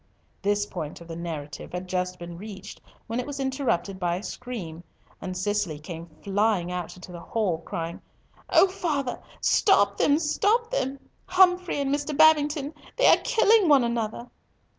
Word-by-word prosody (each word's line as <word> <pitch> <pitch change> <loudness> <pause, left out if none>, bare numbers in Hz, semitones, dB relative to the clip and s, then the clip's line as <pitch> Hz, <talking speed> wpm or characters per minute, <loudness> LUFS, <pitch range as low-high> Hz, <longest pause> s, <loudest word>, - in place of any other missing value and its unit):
This 205 +1 +1
point 160 -6 -6
of 170 - -12
the 165 - -6
narrative 165 -3 -6
had 180 +1 -4
just 180 0 -2
been 175 -1 -8
reached 200 +2 -9 0.2
when 230 +2 -3
it 250 - -3
was 285 -1 -5
interrupted 265 -8 -1
by 175 -2 0
a 185 - -6
scream, 190 -12 -6 0.4
and 185 -1 -5
Cicely 205 -4 -1
came 165 +2 -8 0.2
flying 200 -3 +1
into 180 +1 -6
the 175 - -8
hall, 185 -3 -1
crying, 165 0 -5 0.5
"O - - +6
father, 300 -9 -2 0.2
father, 285 - +4
stop 415 +9 +1
them! 275 - -1 0.3
Humfrey 365 -4 +3
and 280 0 0
Mr. 290 0 -2
Babington! 300 -1 +4 0.2
They - - +3
are - - +6
killing 440 -5 +4
one 280 -4 +6
another." 235 0 -3
210 Hz, 155 wpm, -26 LUFS, 180-290 Hz, 0.5 s, O